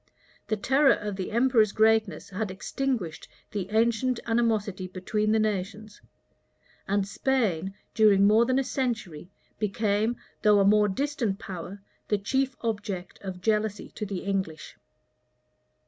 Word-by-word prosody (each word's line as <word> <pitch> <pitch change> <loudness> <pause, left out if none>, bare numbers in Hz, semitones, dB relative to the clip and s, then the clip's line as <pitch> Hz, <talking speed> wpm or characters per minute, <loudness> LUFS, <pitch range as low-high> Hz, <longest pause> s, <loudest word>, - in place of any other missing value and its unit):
The 215 - 0
terror 270 +6 +4
of 205 -1 -5
the 190 -1 -4
emperor's 235 -2 +3
greatness 220 -2 +2
had 205 +2 -3
extinguished 210 -2 -3 0.2
the 195 -3 -4
ancient 235 +3 +1
animosity 220 -5 0
between 210 +4 -1
the 220 - +3
nations; 210 0 -3 0.9
and 200 0 +1
Spain, 195 -6 0 0.2
during 205 -3 +5
more 215 +3 +5
than 255 0 +2
a 270 - +2
century, 230 - -3 0.3
became, 210 +2 0 0.3
though 210 -2 +5
a 195 - +4
more 210 +1 +5
distant 240 -2 -1
power, 195 0 -8 0.2
the 210 - +2
chief 265 +6 -1
object 205 -5 -4
of 185 -2 -7
jealousy 210 0 0
to - - -7
the 190 -2 -4
English. 190 -5 -3
210 Hz, 130 wpm, -27 LUFS, 195-230 Hz, 0.9 s, during